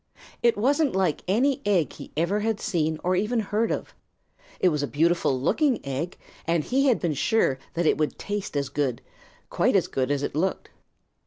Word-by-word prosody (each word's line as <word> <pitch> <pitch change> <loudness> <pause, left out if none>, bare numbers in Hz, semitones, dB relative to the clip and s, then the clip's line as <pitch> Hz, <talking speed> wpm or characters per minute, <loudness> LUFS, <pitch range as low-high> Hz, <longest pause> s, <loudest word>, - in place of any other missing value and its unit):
It 235 -2 +3
wasn't 280 +4 +2
like 185 -5 +1
any 250 +8 +2
egg 190 -7 +1
he - - -11
ever 170 +6 +1
had 220 0 -1
seen 160 -6 -1
or 185 +1 +2
even 215 +6 0
heard 215 +2 0
of. - - -4 0.7
It 185 - +4
was 150 -3 -1
a 145 - -1
beautiful 160 -3 +1
looking 270 - +2
egg, 140 +6 -3 0.3
and 165 -2 +2
he 270 - +1
had 250 - +3
been 170 -4 0
sure 140 -2 +1 0.2
that 170 0 0
it - - +3
would 155 - -1
taste 205 -7 -4
as 140 -1 -1
good, 135 -5 -2 0.5
quite - - +2
as - - +4
good 130 -1 -1
as 145 -1 0
it - - -2
looked. 180 +6 -2
180 Hz, 190 wpm, -25 LUFS, 150-220 Hz, 0.7 s, It